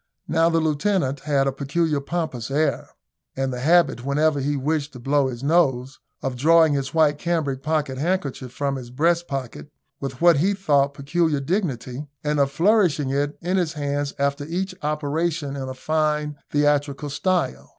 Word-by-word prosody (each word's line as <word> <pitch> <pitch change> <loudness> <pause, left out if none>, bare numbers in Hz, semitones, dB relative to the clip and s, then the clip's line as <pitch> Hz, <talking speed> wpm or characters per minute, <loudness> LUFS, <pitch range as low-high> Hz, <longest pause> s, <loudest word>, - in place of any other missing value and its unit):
Now 165 +1 +3
the 165 -1 +2
lieutenant 155 -2 0
had 140 -1 +1
a 135 - +1
peculiarly 145 +2 -1
pompous 150 -8 -3
air, 150 +3 0 0.5
and 135 -1 -1
the 125 - -4
habit, 160 -3 +3
whenever 145 +2 +1
he 145 +1 -1
wished 145 +1 -1
to 125 - -9
blow 140 +2 +2
his 125 0 -6
nose, 135 -5 +1 0.2
of 135 -1 -2
drawing 160 +3 +5
his 135 -2 -2
white 150 -2 +3
cambric 155 -6 -1
pocket 150 -3 -1
handkerchief 145 -6 -2
from 140 +1 -2
his 125 -2 -8
breast 170 +6 +1
pocket 125 - -5 0.3
with 135 -2 -5
what 170 -2 +6
he 195 +7 +2
thought 140 -7 +2
peculiar 150 +1 0
dignity, 140 - -2 0.2
and 150 0 0
of 140 -1 +3
flourishing 170 -4 +2
it 145 +2 -1
in 180 +3 0
his 170 -4 0
hand 145 -1 -2
after 140 +1 0
each 185 +4 -3
operation 150 0 -1
in 135 -1 -5
a 130 - -6
fine 150 +1 0
theatrical 145 0 +1
style. 170 - -1
145 Hz, 170 wpm, -23 LUFS, 135-165 Hz, 0.5 s, what